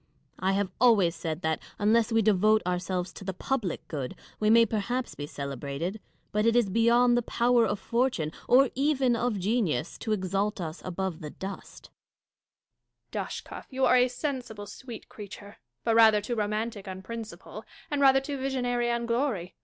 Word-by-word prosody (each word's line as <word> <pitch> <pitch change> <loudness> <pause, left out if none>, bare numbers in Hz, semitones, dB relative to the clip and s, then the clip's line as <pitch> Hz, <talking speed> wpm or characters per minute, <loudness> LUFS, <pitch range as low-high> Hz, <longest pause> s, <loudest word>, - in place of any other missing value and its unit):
I 190 +1 +1
have 195 -1 0
always 200 -9 +5
said 160 0 -4
that, 160 0 0 0.2
unless 220 +2 +3
we 225 0 +3
devote 215 +1 +4
ourselves 180 0 -2
to - - -10
the 190 -1 -4
public 235 -6 -2
good, 135 -5 -4 0.2
we 215 - +2
may 230 +1 +7
perhaps 240 +4 -2
be 145 - -6
celebrated; 140 - -4 0.3
but 210 0 +1
it 230 +1 +3
is 235 -5 +3
beyond 235 +3 +4
the 240 - +3
power 235 0 +2
of 205 - -2
fortune, 235 -10 0 0.2
or 260 +1 +5
even 270 -3 +2
of 235 -2 0
genius, 185 - -1
to 220 - -3
exalt 200 +1 0
us 160 -1 -5
above 185 -2 -3
the 150 - -5
dust. 195 +5 -9 1.2
Catharine. - - -5
Dashkof, - - -21
you 265 -1 +1
are - - +5
a 250 0 +5
sensible, 250 -5 -4
sweet 235 +1 -10
creature; 205 -1 -10 0.3
but 230 - +2
rather 220 -2 +7
too 210 +4 -4
romantic 215 -1 -2
on 190 0 -7
principle, 230 +1 -8 0.3
and 290 -1 0
rather 270 -1 +6
too 275 0 -5
visionary 245 -2 0
on 235 0 0
glory. 235 -7 -1
215 Hz, 170 wpm, -28 LUFS, 190-240 Hz, 1.2 s, may